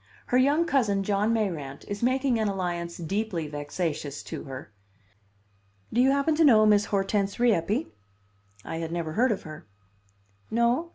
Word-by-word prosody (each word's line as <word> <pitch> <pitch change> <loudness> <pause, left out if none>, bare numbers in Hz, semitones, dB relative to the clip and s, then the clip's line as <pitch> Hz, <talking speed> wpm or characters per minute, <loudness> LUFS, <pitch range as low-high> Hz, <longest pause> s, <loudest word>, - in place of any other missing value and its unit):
Her - - +6
young 290 +6 +3
cousin, 220 -11 +1
John 205 +2 +1
Mayrant, 165 -12 -2
is 205 0 -5
making 255 0 +1
an 220 - +1
alliance 175 -3 -3
deeply 180 -1 -2
vexatious 145 0 -4
to - - -7
her. 130 -5 -8 1.2
Do 245 - +3
you 260 - +5
happen 280 +3 +2
to 330 - +5
know 220 -7 +6
Miss 210 0 +4
Hortense 200 +1 -1
Rieppe?" 210 -5 +2 0.8
I 165 - -4
had 165 0 -4
never 170 -2 -3
heard 240 +8 +2
of 205 - -2
her. 155 -5 -10 0.8
"No? 235 +8 +1
205 Hz, 155 wpm, -27 LUFS, 170-240 Hz, 1.2 s, Her